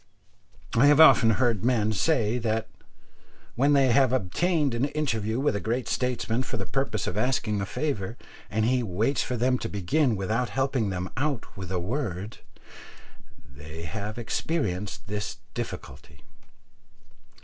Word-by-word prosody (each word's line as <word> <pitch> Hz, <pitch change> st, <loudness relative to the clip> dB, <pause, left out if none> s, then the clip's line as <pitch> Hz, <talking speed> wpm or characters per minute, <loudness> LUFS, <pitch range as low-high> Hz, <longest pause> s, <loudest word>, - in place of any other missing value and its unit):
I 125 Hz, +5 st, +6 dB
have 145 Hz, +1 st, +6 dB
often 160 Hz, -7 st, +8 dB
heard 115 Hz, -3 st, +2 dB
men 110 Hz, -3 st, +2 dB
say 115 Hz, -, +1 dB
that 110 Hz, -1 st, -1 dB, 0.9 s
when 140 Hz, +4 st, +3 dB
they 135 Hz, -3 st, +4 dB
have 130 Hz, 0 st, +4 dB
obtained 140 Hz, -, +1 dB
an 120 Hz, +3 st, +1 dB
interview 115 Hz, -7 st, -1 dB
with 140 Hz, -6 st, +1 dB
a -, -, 0 dB
great 115 Hz, +5 st, -2 dB
statesman 125 Hz, -1 st, -1 dB
for 125 Hz, -, -4 dB
the 95 Hz, -, -4 dB
purpose 135 Hz, -7 st, -1 dB
of 95 Hz, -, -2 dB
asking 110 Hz, -4 st, 0 dB
a 100 Hz, -, -3 dB
favour, 115 Hz, -4 st, -3 dB, 0.3 s
and 110 Hz, +4 st, 0 dB
he 125 Hz, +2 st, +2 dB
waits 110 Hz, +6 st, 0 dB
for 125 Hz, -, -2 dB
them 125 Hz, +2 st, +2 dB
to 115 Hz, -, -4 dB
begin 110 Hz, -, +1 dB
without 110 Hz, +5 st, -1 dB
helping 135 Hz, -2 st, 0 dB
them 90 Hz, -1 st, -3 dB
out 140 Hz, -3 st, -2 dB
with 95 Hz, -2 st, -7 dB
a 95 Hz, -, 0 dB
word, 105 Hz, -, -3 dB, 1.2 s
they 75 Hz, +3 st, -9 dB
have 105 Hz, +5 st, -5 dB
experienced 110 Hz, -, -2 dB
this 105 Hz, 0 st, -4 dB, 0.2 s
difficulty. 70 Hz, +1 st, -7 dB
115 Hz, 150 wpm, -26 LUFS, 100-130 Hz, 1.2 s, often